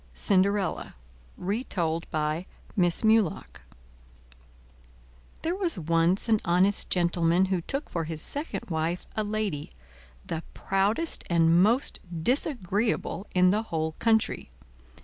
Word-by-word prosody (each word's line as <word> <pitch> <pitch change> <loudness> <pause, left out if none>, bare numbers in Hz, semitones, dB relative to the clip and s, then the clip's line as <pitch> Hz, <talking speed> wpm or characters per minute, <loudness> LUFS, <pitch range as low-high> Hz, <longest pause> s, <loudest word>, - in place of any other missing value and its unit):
CINDERELLA 200 0 +1 0.4
Retold 180 -5 -2
by 155 +3 -1 0.3
Miss 175 -1 +1
Mulock 220 -6 +2 1.8
There 330 - 0
was 365 - -1
once 165 +4 +1
an 220 -2 +3
honest 185 +4 +2
gentleman 175 0 +2
who 180 - 0
took 275 - -4
for 165 -2 -3
his 160 -1 -5
second 215 - -5
wife 165 +2 -1
a 215 - 0
lady, 205 -8 -2 0.6
the 165 - -3
proudest 205 +12 0
and 170 0 +4
most 230 +7 +2 0.2
disagreeable 215 - 0
in 180 0 +5
the 210 +2 +2
whole 160 -7 -2
country. 220 -1 +1
185 Hz, 110 wpm, -27 LUFS, 165-215 Hz, 1.8 s, in